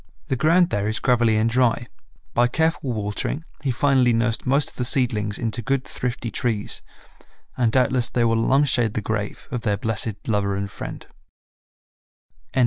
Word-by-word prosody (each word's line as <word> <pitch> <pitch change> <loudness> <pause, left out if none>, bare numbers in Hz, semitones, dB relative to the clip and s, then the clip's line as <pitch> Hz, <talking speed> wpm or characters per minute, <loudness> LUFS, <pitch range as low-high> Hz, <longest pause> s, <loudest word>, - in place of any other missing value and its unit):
The 135 - +1
ground 170 +6 +3
there 105 0 0
is 110 0 -2
gravelly 120 -3 +3
and 110 +1 +2
dry; 120 0 +2 0.5
by 120 +1 +4
careful 160 0 0
watering 110 +8 -3 0.2
he 140 - 0
finally 130 -1 +3
nursed 115 +1 0
most 140 +3 +2
of - - -24
the 125 - -1
seedlings 115 -5 +1
into 115 -1 -2
good, 135 +3 -1
thrifty 125 -2 -4
trees, 110 -1 -2 0.7
and 120 -3 +2
doubtless 125 0 +2
they 120 -1 +1
will 115 0 +2
long 135 +5 +3
shade 120 -6 +1
the 110 - 0
grave 105 -1 -4
of 125 - -2
their 105 -4 0
blessed 110 0 -3
lover 100 -3 0
and 100 0 -3
friend. - - -7
120 Hz, 165 wpm, -23 LUFS, 110-130 Hz, 0.7 s, by